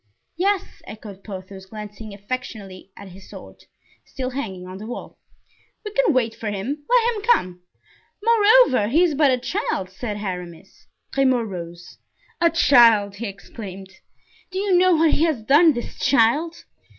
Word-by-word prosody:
"Yes," 390 +2 -1
echoed 205 -3 -11
Porthos, 190 -1 -9
glancing 210 +1 -9
affectionately 200 -3 -7
at 200 -1 -11
his 190 +1 -14
sword, - - -13 0.4
still 260 -1 -5
hanging 195 -9 -5
on 185 +1 -9
the 215 - -8
wall; 245 - -8 0.7
"we 420 - -5
can 485 -3 +2
wait 240 -5 +1
for 225 -1 -5
him; 240 +9 -4
let 480 -1 +3
him 420 - -5
come." 185 - +1 0.6
"Moreover, 450 - +5
he 310 +10 +3
is 340 -4 +2
but 290 0 +3
a 255 - +2
child," 245 - -3
said 210 +2 -5
Aramis. 180 -3 -8 0.3
Grimaud 260 -4 +2
rose. 175 -1 -9 0.4
"A 335 - +5
child!" 230 -10 +4
he 230 +2 -4
exclaimed. 195 -1 -10 0.6
"Do 375 - -6
you 390 -1 +1
know 365 0 +4
what 320 0 +3
he 310 - +1
has 295 -9 -1
done, 300 +6 +5
this 240 -2 -7
child? 285 +7 +1
230 Hz, 155 wpm, -22 LUFS, 195-325 Hz, 0.7 s, Moreover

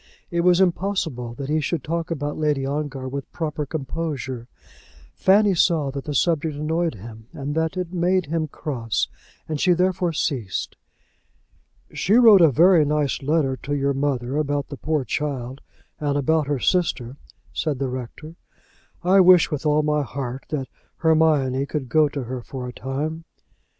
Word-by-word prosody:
It 170 0 +1
was 180 0 +4
impossible 175 -10 0
that 135 +1 -5
he 155 +2 +1
should 155 -1 -2
talk 165 +1 -3
about 145 -3 -3
Lady 150 -3 0
Ongar 140 -2 -3
with 140 +1 -6
proper 150 -3 -3
composure. 135 -4 -4 0.7
Fanny 200 +1 +4
saw 160 -5 +2
that 140 0 -6
the 150 - -4
subject 160 +1 +1
annoyed 160 0 -1
him 110 +2 -11
and 140 +1 -4
that 160 +3 -1
it 180 -1 -3
made 180 +1 +1
him 160 +1 -1
cross, 120 -7 -2 0.4
and 155 -2 -3
she 180 - +4
therefore 180 0 +1
ceased. 130 - -2 1.2
"She 200 - 0
wrote 225 -6 +8
a 165 - +7
very 165 +4 +5
nice 150 -1 0
letter 140 -2 +1
to 145 +2 -3
your 140 0 +1
mother 135 -1 -1
about 145 -1 -1
the 140 - -6
poor 155 -2 -1
child, 135 -1 -3 0.4
and 145 -1 0
about 150 +1 +1
her 145 -1 0
sister," 140 -7 0 0.4
said 150 -4 -1
the 135 +1 -1
rector. 130 +5 -7 0.7
"I 185 +3 +5
wish 180 -3 +6
with 150 +1 -2
all 150 0 +3
my 150 0 +1
heart 130 0 -5
that 135 -4 -3 0.3
Hermione 150 -5 +2
could 140 -5 -4
go 155 +1 +4
to 140 -2 -4
her 125 +1 -5
for 125 +1 -7
a 125 - -7
time." 155 +6 -4
150 Hz, 165 wpm, -23 LUFS, 135-165 Hz, 1.2 s, wrote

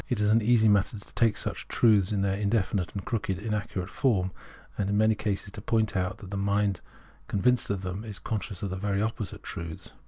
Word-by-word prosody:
It 125 - 0
is 105 0 +3
an 115 +1 +5
easy 110 0 +4
matter 105 +1 +3
to 100 - -13
take 115 -3 +3
such - - -4
truths 105 -4 +4
in 100 -2 +1
their 95 -1 +1
indefinite 100 -3 0
and 100 - -4
crooked 100 -5 -1
inaccurate 105 -3 -3
form, 100 -9 +1 0.4
and 100 -1 -1
in 100 - +2
many 110 +1 +5
cases 105 -1 -2
to 105 - -8
point 110 -1 +1
out 95 +2 0
that 100 -3 -10
the 100 - -2
mind 100 -1 +1 0.5
convinced 125 +5 +2
of 100 -2 -1
them 95 +3 -4
is 105 -3 -6
conscious 105 -3 -4
of 100 - -2
the 95 - -3
very 100 0 0
opposite 110 -2 -4
truths. 80 -1 -7
100 Hz, 215 wpm, -28 LUFS, 95-110 Hz, 0.5 s, an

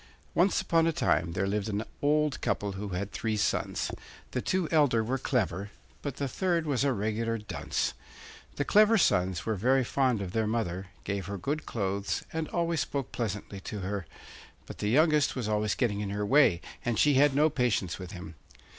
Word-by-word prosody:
Once 185 +3 +3
upon 165 -1 +2
a - - +3
time 85 - +1
there 95 +2 0
lived 105 +2 -1
an 105 +1 -1 0.2
old 150 0 +2
couple 100 -1 -1
who 100 +2 -5
had 95 +2 -3
three 110 -2 -2
sons; 105 - 0 0.4
the - - -1
two 185 -3 0
elder 145 -8 +4
were 130 +4 -1
clever, 105 -7 -1 0.3
but 140 -3 -4
the 140 - -2
third 170 +3 0
was 140 -4 +1
a 140 - +3
regular 115 +1 -1
dunce. 105 -1 -2 0.6
The 145 - -1
clever 215 +5 +5
sons 95 - +2
were 110 - 0
very 130 +6 +2
fond 130 -2 +1
of 95 -3 -4
their 110 +1 0
mother, 95 -5 -2 0.2
gave 100 -2 -3
her 100 0 -4
good 145 - -3
clothes, 100 -2 -2
and 160 -1 -2
always 170 -2 0
spoke 140 -3 -3
pleasantly 105 -3 -4
to 100 +1 -6
her; 95 -2 -3 0.6
but - - -10
the 105 - 0
youngest 150 +3 +3
was 125 -5 -2
always 105 -1 +1
getting 105 -5 0
in 105 -1 -3
her 105 +1 -2
way, 110 - +4 0.2
and 120 -2 0
she 150 - +5
had 140 +1 +4
no 150 +2 +4
patience 115 - 0
with 90 -1 -7
him. 90 -4 -8
115 Hz, 190 wpm, -29 LUFS, 100-145 Hz, 0.6 s, clever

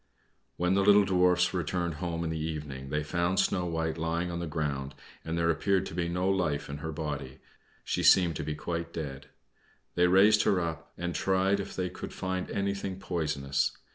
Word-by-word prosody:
When 90 +1 +2
the 100 - +3
little 100 +1 +6
Dwarfs 90 -1 +3
returned 85 -1 -1
home 85 -2 -2
in 80 - -2
the 80 - -3
evening 75 -4 -5
they 75 +1 -1
found 85 +4 0
Snow 90 -2 +1
White 80 -1 -2
lying 85 +2 -1
on 85 - -3
the 85 - -3
ground, 75 -3 -3 0.3
and 80 +1 -3
there 85 0 +3
appeared 95 +3 +1
to - - -7
be 85 0 -1
no 90 +2 0
life 90 -8 0
in 70 - -4
her 80 +2 -4
body; 75 -4 -5 0.5
she - - -1
seemed 85 -4 +5
to - - -3
be 75 0 -3
quite 85 +2 -4
dead. 70 -4 -6 0.7
They 90 0 +4
raised 100 +4 +6
her 95 - +3
up, 80 -1 -4
and 85 0 -3
tried 95 +2 +2
if 100 - -5
they 90 -1 -2
could - - -7
find 95 -1 -3
anything 100 -1 -2
poisonous. 75 -7 -1
85 Hz, 195 wpm, -29 LUFS, 80-95 Hz, 0.7 s, little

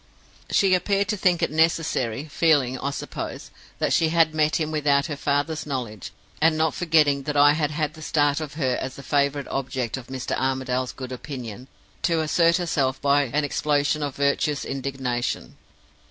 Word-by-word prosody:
"She 195 -2 +3
appeared 200 +2 +1
to - - +1
think 180 -3 +2
it - - +1
necessary 155 -6 +1
feeling, 145 -5 +2
I 140 - -2
suppose, 140 - -6 0.3
that - - 0
she 160 - +3
had 165 -1 +3
met 155 0 +2
him 155 -1 -2
without 145 -2 +2
her 155 - -4
father's 145 +2 -1
knowledge, 120 -8 -4 0.3
and 160 0 +4
not 160 -1 +1
forgetting 155 -5 +3
that 145 - -1
I 145 0 +7
had 150 -1 0
had 150 0 -2
the 160 - -12
start 145 -1 +1
of 150 -2 -6
her 130 -5 0
as 130 0 -5
the 140 - -10
favored 140 0 0
object 130 -3 -3
of 125 -2 -9
Mr. 130 -1 -3
Armadale's 130 -1 -1
good 130 -1 -8
opinion 125 -2 -7 0.3
to 165 -2 +1
assert 165 +2 +3
herself 140 -7 0
by 140 0 +3
an 145 +4 -1
explosion 145 +1 0
of 145 -2 -3
virtuous 140 +1 0
indignation. 130 -3 -3
145 Hz, 175 wpm, -24 LUFS, 130-155 Hz, 0.3 s, I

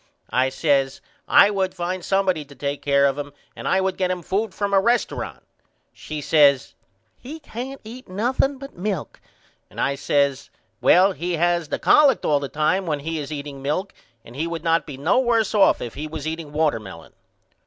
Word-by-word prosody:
I 130 +1 +2
says 135 -1 +1 0.3
I 205 - +6
would 190 -2 -1
find 180 +1 -3
somebody 190 -5 +1
to 140 0 -15
take 140 +2 -4
care 140 -1 +3
of 140 +1 +1
him 145 -1 -6 0.2
and - - -6
I 190 - +3
would 190 0 -1
get 185 -1 0
him 180 -1 -3
food 205 +5 -1
from 200 0 -3
a 195 - +5
resturunt. 235 +4 -1 0.5
She 155 -1 -7
says 140 -3 +4 0.5
He 300 +6 -9
can't 265 -1 -7
eat 235 +2 -11
nothing 250 +8 0
but 275 +1 -10
milk 185 -3 -4 0.5
and - - -11
I 140 - +1
says 140 0 0 0.3
Well 190 +3 +5
he 180 -1 -4
has 170 0 +1
the - - -2
collect 285 -5 +4
all 145 -1 +3
the 140 -1 -5
time 180 +5 0
when 150 -3 -1
he 160 +2 -3
is 145 -1 -6
eating 140 -2 -6
milk 155 +8 -2 0.3
and 120 - -13
he 160 +4 -2
would 170 -2 -5
not 165 0 +1
be 140 -3 -7
no 160 - +2
worse 230 -5 +1
off 205 -2 +4
if 120 - -6
he 155 +2 -5
was 150 -1 -7
eating 160 -1 -5
watermelon. 115 - -2
165 Hz, 195 wpm, -22 LUFS, 145-195 Hz, 0.5 s, I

